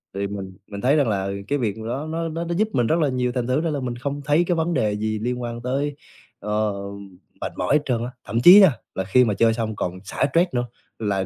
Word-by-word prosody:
thì 100 0 -1
mình 95 -2 -7
mình 100 -1 -7
thấy 135 +4 +3
rằng 145 -4 +3
là 100 -2 -1 0.2
cái 145 - +1
việc 110 -5 -1
đó, 120 +7 -4
nó 165 +1 -2
nó 165 +2 -3
nó 170 - -2
giúp 215 +4 +2
mình 120 -3 +2
rất 160 +7 +2
là 150 -3 +2
nhiều 125 -1 0
thành 120 -1 -2
thử 130 +4 +1
ra 165 - -1
là 145 -2 -2
mình 125 -2 -3
không 140 +4 -4
thấy 150 +4 +3
cái 175 - +2
vấn 165 +1 0
đề 110 -8 +1
gì 110 0 -2
liên 125 +3 -2
quan 120 -1 -5
tới, 140 +4 -2 0.4
ờ, 105 0 -1 0.7
mệt - - -3
mỏi - - +1
hết 150 - +3
trơn 120 -3 0
á, 125 - -6
thậm 115 - -1
chí 180 +9 +10
nha, 190 -5 +7 0.2
là 95 - -1
khi 125 +7 +4
mà 105 - +1
chơi 115 +2 +3
xong 110 -1 -3
còn 90 -2 -3
xả 100 - -1
stress 170 +6 +3
nữa, 120 -1 0 0.3
là 100 -3 -1
125 Hz, 265 wpm, -23 LUFS, 110-145 Hz, 0.7 s, chí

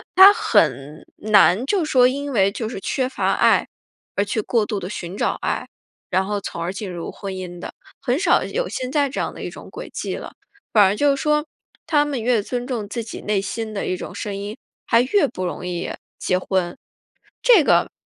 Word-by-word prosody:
她 385 +2 +10
很 150 - +1
难 210 0 +4
就 380 -6 +1
说 255 -4 +5
因 280 +2 -3
为 200 -4 +3
就 220 +1 -4
是 220 - -5
缺 260 -2 -1
乏 260 - 0
爱， - - +3 0.5
而 200 - +1
去 210 +2 -1
过 225 0 +1
度 210 -2 -3
地 180 - -6
寻 180 -2 -6
找 - - 0
爱， - - -2 0.4
然 190 +1 +1
后 205 0 -2
从 170 - -6
而 170 +3 -2
进 195 0 -5
入 170 -1 -5
婚 195 -2 -6
姻 180 -1 -7
的。 - - -7 0.3
很 250 +4 0
少 360 -1 +3
有 - - -2
现 255 0 -4
在 285 -2 +2
这 - - -4
样 - - -2
的 - - -9
一 - - -3
种 - - -11
轨 - - -8
迹 - - -3
了， - - -8 0.4
反 210 - +7
而 195 +1 +3
就 285 +4 +3
说 300 +2 +1 0.4
她 295 -2 +3
们 280 -5 -3
越 235 -3 +3
尊 245 +3 -4
重 235 -6 -4
自 235 0 -3
己 220 - -8
内 210 -1 0
心 220 +2 -4
的 195 - -2
一 185 - -1
种 - - -8
声 205 -3 -4
音， 205 +3 -6 0.3
还 230 0 +5
越 290 +4 +3
不 185 -7 -5
容 180 0 -4
易 175 0 -3 0.3
结 180 - 0
婚， 185 -2 -1 0.7
这 455 -10 +7
个， - - +3
215 Hz, 230 characters per minute, -22 LUFS, 190-270 Hz, 0.7 s, 她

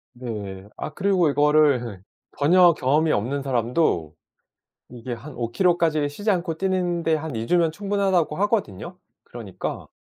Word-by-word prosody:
네. 105 -5 -7
아 150 - -6
그리고 185 -4 +2
이거를 140 -8 +2 0.3
전혀 175 +4 +5
경험이 150 +5 +1
없는 135 +6 -1
사람도 120 - 0 0.8
이게 125 0 -7
한 145 +6 -8
5km 170 +10 +1
까지 155 -4 +1
쉬지 205 +9 -2
않고 175 -3 -1
뛰는 180 -2 -1
데 160 -1 +2
한 155 -3 -6
2 115 +1 -3
주면 170 -2 +2
충분하다고 195 -5 0
하거든요. 185 - -2 0.3
그러니까 110 -6 -7
150 Hz, 285 characters per minute, -23 LUFS, 120-175 Hz, 0.8 s, 전혀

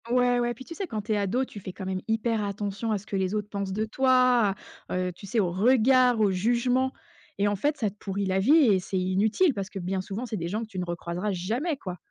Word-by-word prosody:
Ouais, 245 0 +3
ouais, 240 0 0
puis 260 - -11
tu - - -8
sais 385 +2 -4
quand 215 -6 -4
tu 220 - -5
es - - +1
ado, 205 +6 0
tu 210 - -10
fais 185 -1 -8
quand 190 - -7
même 185 0 -2
hyper 225 0 0
attention 205 +2 -3
à 215 - +1
ce 200 - -11
que 205 - -5
les 190 +1 0
autres 210 -1 -3
pensent 200 -2 -3
de 215 +3 -1
toi. 250 -3 +3 0.4
Heu, 180 0 -1
tu 200 - -11
sais 230 +3 0
au 180 -4 +1
regard, 250 +4 +4
au 205 -2 +3
jugement 245 +6 +1 0.5
et 200 - +2
en 205 - +1
fait 290 +9 0
ça 215 - 0
te - - -22
pourrit 200 0 -3
la 190 0 +1
vie 210 +9 +3 0.2
et 190 - +3
c'est 190 +1 -4
inutile 210 - +2
parce 195 -3 -4
que 200 - -8
bien 185 +1 -2
souvent 200 +6 -5
c'est 225 -3 -4
des 170 -2 -3
gens 210 +6 -2
que - - -8
tu 195 -4 -6
ne 180 - -2
re-croiseras 175 +3 -3
jamais 230 - -2
quoi. 185 -7 -6
210 Hz, 270 wpm, -27 LUFS, 190-245 Hz, 0.5 s, regard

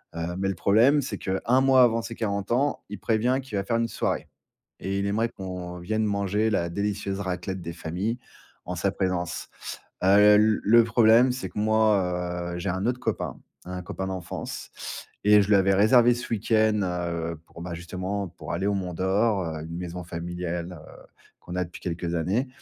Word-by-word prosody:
Heu, 85 +1 -3
mais 95 +1 0
le 95 - -2
problème, 115 - +4
c'est 135 - -4
qu'un 115 +7 +1
mois 135 -1 +6
avant 115 -1 +3
ses 115 - -6
40 100 -2 -2
ans, 140 +5 +1
il 105 -1 -6
prévient 120 +5 +1
qu'il 125 -6 -5
va 100 - 0
faire 115 +4 0
une 115 0 +1
soirée - - -2 0.5
et 100 +1 -2
il 100 - -1
aimerait 110 +3 +1
qu'on 90 -3 -6
vienne 110 +5 -1
manger 100 +1 +1
la 85 -5 0
délicieuse 100 +1 -2
raclette 95 -1 -3
des 85 0 -6
familles 90 +8 -3 0.5
en 90 - -4
sa 95 +3 0
présence. 95 -3 -2 0.5
Heu - - +3 0.3
l 105 +1 +4
le 115 +3 +6
problème, 115 +2 +5
c'est 125 +1 -4
que - - -6
moi, 90 -5 +1
heu, - - -4
j'ai 100 - -2
un 95 +3 -2
autre 125 0 0
copain, - - -3 0.3
un 90 0 -5
copain 95 +2 -4
d'enfance 95 -2 -6 0.5
et 105 0 +7
je - - -5
lui 105 - +6
avais 95 0 +4
réservé 120 +4 +6
ce 120 - -6
week-end. 110 0 +2
Heu, 85 -2 -3
pour 85 - -12
bah 85 0 -5
justement 95 +3 -4
pour 85 0 -9
aller 90 +3 -1
au 100 - +2
mont 95 -3 -3
d'or 95 +3 +1
heu, 80 -2 -4
une 85 +1 -6
maison 90 0 -5
familiale, 85 +1 -4
heu, - - -14 0.4
qu'on 90 - -8
a 90 - +1
depuis 85 - -12
quelques 85 0 -3
années. 95 - 0
95 Hz, 195 wpm, -26 LUFS, 90-110 Hz, 0.5 s, et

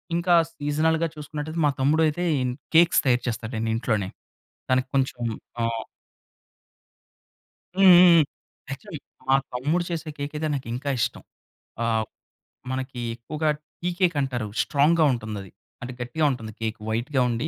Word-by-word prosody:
ఇంకా 175 0 +3 0.2
సీజనల్‌గా 160 +3 +1
చూసుకున్నటయితే, 155 +2 -5
మా 145 - +4
తమ్ముడైతే 155 +4 +2 0.2
ఇన్ 125 -1 -1 0.2
కేక్స్ 170 +1 +6
తయారు 125 -2 +3
చేస్తాడండి 115 -1 -2
ఇంట్లోనే. 105 -5 -1 0.6
తనకి 130 0 +2
కొంచెం 130 -2 0 0.4
ఆహ్ 115 -1 -1 1.9
హుహుహు. 180 -3 +8 0.5
యాక్చువల్‌‌లి 155 +2 -7 0.3
మా 135 - +6 0.2
తమ్ముడు 150 +8 0
చేసిన 165 -2 -4
కేకయితే 150 +2 -3
నాకింకా 130 +1 -3
ఇష్టం. - - -1 0.6
ఆహ్, 110 -1 +1 0.7
మనకి 130 -1 -4 0.2
ఎక్కువగా 150 +6 -2 0.3
టీ 175 - 0
కేక్ 175 -3 +3
అంటారు 120 -5 -2
స్ట్రాంగ్‌గా 155 +3 +3
ఉంటుంది 110 -3 -4
అది. 95 - -12 0.3
అంటే 125 +1 -6
గట్టిగా 150 +6 -1
ఉంటుంది 115 -4 -5
కేక్ 110 0 -2
వైట్‌గా 125 +5 0
ఉండి 120 +6 -1
140 Hz, 125 wpm, -25 LUFS, 120-160 Hz, 1.9 s, హుహుహు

